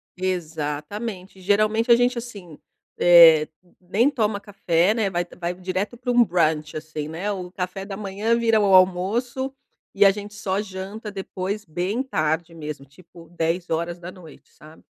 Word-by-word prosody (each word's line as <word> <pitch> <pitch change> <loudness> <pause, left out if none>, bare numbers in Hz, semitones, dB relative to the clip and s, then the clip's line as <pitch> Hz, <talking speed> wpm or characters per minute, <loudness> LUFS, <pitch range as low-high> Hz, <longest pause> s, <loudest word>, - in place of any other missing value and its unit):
Exatamente. 180 +3 -4
Geralmente 215 +4 +2
a - - +9
gente 245 +1 +1
assim, 200 -9 -8 0.4
eh, 165 -3 +8 0.3
nem 200 +9 +2
toma 215 -7 -1
café, 195 -2 +1
né? 220 -3 0
Vai 175 -1 -1
vai 175 0 -2
direto 185 +5 -4
para 245 +1 -2
um 245 0 +6
brunch, 160 -5 0
assim, 155 -1 -6
né? 170 +7 -3
O 180 -3 -6
café 185 +1 -5
da 195 -1 -7
manhã 210 +3 -1
vira 225 -2 +3
o 200 -2 +3
almoço 210 +9 +2 0.4
e 205 0 +4
a 195 - +7
gente 205 +1 -8
só 200 -2 -2
janta 205 +2 -7
depois, 195 +1 -5
bem 180 +9 -2
tarde 160 - -1
mesmo, 150 -3 -7
tipo 165 +3 -17
22h, 170 0 -4
sabe? 155 +1 -17
185 Hz, 150 wpm, -23 LUFS, 170-210 Hz, 0.4 s, a